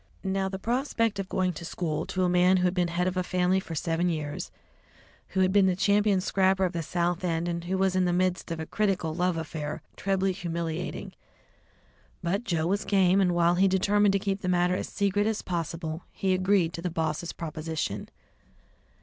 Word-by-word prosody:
Now, 190 0 0
the 190 - -4
prospect 230 -1 0
of 195 -1 -4
going 185 -1 0
to 170 - -8
school 160 -2 -3
to 185 - -1
a - - +3
man 180 +1 +4
who 180 - 0
had 180 -1 +2
been 180 -2 +1
head 170 +1 -1
of 185 0 -2
a - - +2
family 180 +1 +1
for 165 -3 -7
seven 165 +3 0
years, 150 -3 -3 0.8
who 190 - -1
had 185 0 +3
been 200 -2 +5
the 185 - +2
champion 200 0 +3
scrapper 190 0 +2
of 180 - -2
the 170 - -2
South 175 +2 -1
End, 170 0 -1
who 190 +2 -1
was 190 -1 +1
in 185 -1 +3
the 175 - +2
midst 180 +1 0
of 165 -1 -3
a 160 - -3
critical 190 -5 0
love 180 0 0
affair, 150 -2 -4
was - - -13
trebly 195 0 +1
humiliating. 170 -3 -4 1.1
But 190 +6 0
Joe 170 -6 0
was 200 +4 0
game, 195 -1 +3
and 180 -2 +2
while 170 0 +4
he 190 +2 +4
determined 200 +2 +3
to - - +4
keep 195 0 -2
the 185 - -2
matter 180 0 +2
as - - -3
secret 205 +1 0
as 220 -1 -1
possible, 165 -1 -3
he 190 -1 0
agreed 185 -2 +2
to 170 - -5
the 180 - -2
boss's 160 0 -2
proposition. 160 -1 -4
180 Hz, 205 wpm, -27 LUFS, 170-190 Hz, 1.1 s, been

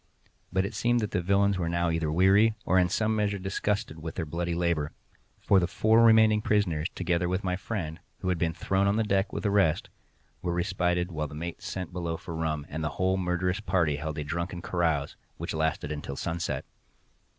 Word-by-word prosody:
But 95 +1 +1
it 105 - -5
seemed 120 +1 +2
that 105 - -2
the 90 - 0
villains 100 +1 +2
were 85 -2 -1
now 85 0 +1
either 80 -2 0
weary, 100 +6 +5
or 95 - +4
in 90 -1 +3
some 110 +4 +1
measure 105 -1 0
disgusted 95 -2 -2
with 80 0 -6
their 85 - -2
bloody 85 +2 -2
labour; 85 -4 0 0.5
for 100 - +4
the 85 - +1
four 110 +4 +4
remaining 110 -1 +6
prisoners, 90 -7 +1
together 90 0 0
with 95 +2 -1
my 90 -1 0
friend, 90 -5 -4 0.2
who 95 - -1
had 90 -2 0
been 80 -1 +1
thrown 95 +1 +1
on 100 - +2
the 110 - +2
deck 100 -2 +1
with - - -4
the 105 - +1
rest, 100 -7 +2 0.5
were 85 -1 -1
respited 90 -1 0
while 75 -2 -2
the 75 - -10
mate 85 +2 -5
sent 90 -2 -5
below 85 -2 -2
for 85 - -7
rum, 80 -2 -2
and 80 +2 -4
the 75 - 0
whole 95 0 +2
murderous 90 +1 0
party 90 -8 +1
held 80 +1 -4
a 75 - -2
drunken 85 +4 -3
carouse, 80 -5 0 0.2
which - - -4
lasted 80 -1 -1
until 75 -2 -5
sunset. 85 +3 -3
90 Hz, 205 wpm, -28 LUFS, 80-100 Hz, 0.5 s, remaining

